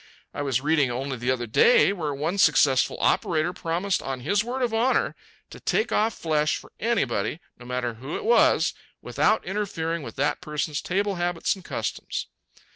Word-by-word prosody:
I - - -4
was 135 -3 0
reading 150 -2 +2
only 130 +2 -3
the 120 +1 -3
other 125 -2 0
day 195 - +5
where 160 -6 -3
one 155 +8 -2
successful 135 -5 +4
operator 165 +1 +1
promised 175 +4 -1
on 135 -2 -4
his 200 +10 +1
word 250 +3 -3
of 235 -2 0
honor 235 +4 +1 0.4
to - - -10
take 445 - 0
off 220 +1 +1
flesh 155 -2 +1
for - - -14
anybody, 150 - 0 0.2
no 125 - -12
matter 125 -1 -2
who 130 +7 -7
it - - -5
was, 475 - +4 0.3
without 215 - +1
interfering 170 -4 -2
with - - -8
that 145 +2 0
person's 150 -2 -3
table 200 +1 -1
habits 175 -1 0
and 190 - -13
customs." - - -4
160 Hz, 175 wpm, -25 LUFS, 135-200 Hz, 0.4 s, day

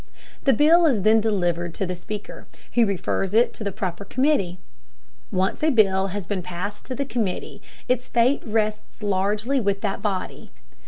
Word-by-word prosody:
The 270 - +5
bill 325 +7 +5
is 230 -10 +1
then 220 +1 +5
delivered 175 -5 0
to 195 - -1
the 180 - -3
Speaker, 205 +4 -8 0.3
who 235 -2 +4
refers 195 0 -1
it 235 +2 +4
to - - -7
the 200 - -2
proper 185 0 -4
committee. 235 - +1 0.7
Once 190 +1 0
a 315 - +4
bill 195 -7 +3
has 195 0 -5
been 195 0 -2
passed 180 +4 -6
to 255 - -5
the 280 - -2
committee 225 -8 -3 0.3
its 250 0 0
fate 240 +4 +3
rests 215 -1 -2
largely 210 +6 +1
with 200 -2 0
that 200 -2 -2
body. 195 -3 -3
205 Hz, 170 wpm, -24 LUFS, 190-235 Hz, 0.7 s, The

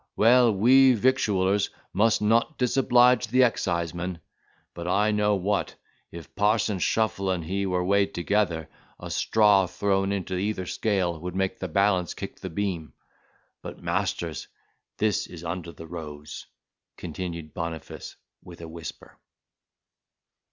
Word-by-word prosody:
Well, 120 +2 +5
we 130 +6 +6
victuallers 105 -5 +2 0.2
must 105 +2 +2
not 115 +8 +2
disoblige 125 -1 +4
the 130 +3 +4
excisemen. 85 -5 -1 0.5
But 85 0 -6
I 105 +4 +2
know 105 0 +2
what; 100 +2 -1 0.4
if 85 -1 -11
parson 105 -1 +1
Shuffle 100 0 0
and 90 -3 -1
he 100 +3 -2
were 90 -1 0
weighed 100 +1 +2
together, 85 -3 0 0.3
a - - -7
straw 105 -4 +3
thrown 95 +1 0
into 95 -2 -3
either 95 -1 -2
scale 90 -5 -1
would 90 +2 -6
make 95 0 -1
the - - -3
balance 95 -4 +1
kick - - -7
the 95 - -6
beam. 85 -3 -3 0.7
But, - - -9
masters, - - -2 0.5
this 105 -2 0
is 85 -2 -10
under 85 0 -5
the 80 - -11
rose," 75 -3 -8 0.5
continued 85 -2 -6
Boniface 85 -1 -6 0.3
with 85 -1 -12
a 85 - -7
whisper. 80 0 -10
95 Hz, 130 wpm, -26 LUFS, 85-105 Hz, 0.7 s, we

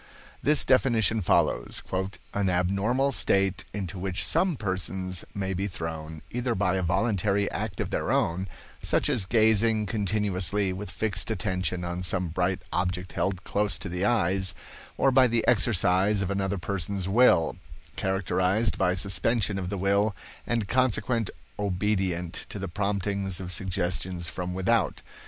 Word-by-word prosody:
This 150 0 +4
definition 115 -4 +3
follows: - - +1 0.5
"An 100 -2 +1
abnormal 100 +10 +1
state 95 -6 +1
into 95 -2 -5
which 95 0 -2
some 185 -3 +2
persons 95 -3 -2
may 95 -1 -2
be 95 +2 -1
thrown, 80 -3 -6
either 120 -1 -1
by 95 -1 +1
a - - 0
voluntary 100 +2 +1
act 105 -3 -4
of - - -2
their - - -1
own, 90 +3 +1 0.3
such - - +1
as 120 -10 +1
gazing 110 0 +3
continuously 100 -2 0
with 100 +3 -6
fixed 110 0 -1
attention 95 -3 -2
on 85 +1 -3
some 90 -1 0
bright 90 +2 -1
object 90 +1 -1
held 95 -1 -2
close 105 0 0
to 95 - -5
the 90 +2 -2
eyes, 95 -4 +1 0.4
or 135 - +3
by 130 0 +6
the 115 -1 0
exercise 100 -2 +3
of 95 - -2
another 100 0 -1
person's 95 +1 -3
will; 100 -6 +4 0.4
characterized 95 +2 0
by 90 -1 +2
suspension 100 +2 +1
of 90 -1 -4
the 100 - -3
will 100 +2 +1 0.3
and 115 -4 0
consequent 125 -2 +1 0.3
obedience 95 -3 -1
to - - -6
the 95 -1 -4
promptings 100 0 -1
of 90 -1 -6
suggestions 90 -2 0
from 90 0 -4
without. 105 +5 +1
95 Hz, 145 wpm, -27 LUFS, 90-105 Hz, 0.5 s, by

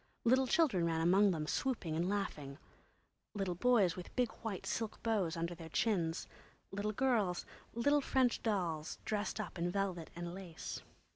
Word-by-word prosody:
Little 260 +2 +4
children 250 - +3
ran 165 -1 +1
among 190 +5 +5
them, 160 -5 -1
swooping 185 -5 -1
and 170 +3 +1
laughing; 155 -9 -3 0.8
little 195 -3 -1
boys 200 -2 +4
with 180 - -9
big 250 -3 +2
white 215 -5 -4
silk 225 -2 -3
bows 195 -7 +1
under 170 +1 -1
their 165 -1 -9
chins, 165 0 0 0.4
little 205 +2 -1
girls, 215 -7 +1 0.3
little 285 +5 +3
French 260 -3 +2
dolls, 175 -8 -1
dressed 210 0 -1
up 210 -4 -5
in 175 +1 +1
velvet 180 -3 -2
and 175 0 -5
lace. 180 -4 -6
195 Hz, 155 wpm, -36 LUFS, 170-225 Hz, 0.8 s, among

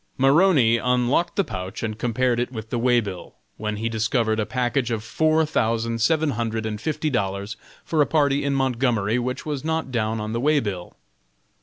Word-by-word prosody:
Maroney 135 -4 +4
unlocked 125 +8 +1
the 200 - +2
pouch 95 - -6
and 110 -1 -3
compared 120 +1 +1
it 120 - -2
with 110 -3 -7
the 120 - -1
way 120 0 +4
bill, 100 -5 -7 0.2
when 105 0 -3
he 110 +2 -2
discovered 110 0 0
a 105 - -1
package 125 0 0
of 110 -2 -2
four 155 +6 +2
thousand 115 -4 -1
seven 155 +4 +2
hundred 115 -1 -2
and 105 -1 -4
fifty 155 +3 -2
dollars 100 -2 -2 0.3
for 160 -2 +1
a 145 - +3
party 145 -3 +2
in 140 0 0
Montgomery 125 -4 +1
which 125 +1 -3
was 145 -3 -3
not 160 -3 -2
down 110 -2 -1
on 105 +1 -4
the 115 - -1
way 150 +2 +3
bill. 95 -8 -5
120 Hz, 190 wpm, -23 LUFS, 110-140 Hz, 0.3 s, Maroney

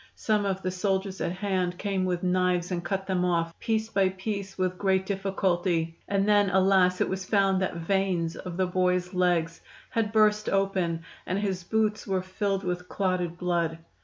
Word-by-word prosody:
Some 210 -2 +1
of 190 -1 -2
the 185 - -1
soldiers 190 +1 -1
at - - 0
hand 185 -2 -1
came 195 -2 -1
with 180 -1 -1
knives 180 -1 +1
and 175 -1 -2
cut 195 +1 -2
them 185 -2 0
off, 165 -2 0
piece 220 -1 0
by 195 -3 +2
piece, 195 +1 -5
with 185 -1 -1
great 190 -1 +2
difficulty, 185 -4 0
and 200 0 +1
then, 205 -1 +4
alas! 185 -1 +3
it - - +3
was 190 0 -3
found 195 -1 +2
that 190 - -1
veins 170 -1 0
of 180 -2 -7
the 190 - +2
boy's 180 0 0
legs 175 -2 +1 0.3
had 225 -2 0
burst 215 -1 +3
open, 190 -4 0 0.2
and 185 - 0
his 195 -3 -2
boots 215 +3 0
were 190 -2 0
filled 195 +1 -2
with 180 0 -3
clotted 180 -3 -1
blood. 170 -2 0
185 Hz, 180 wpm, -27 LUFS, 180-195 Hz, 0.3 s, then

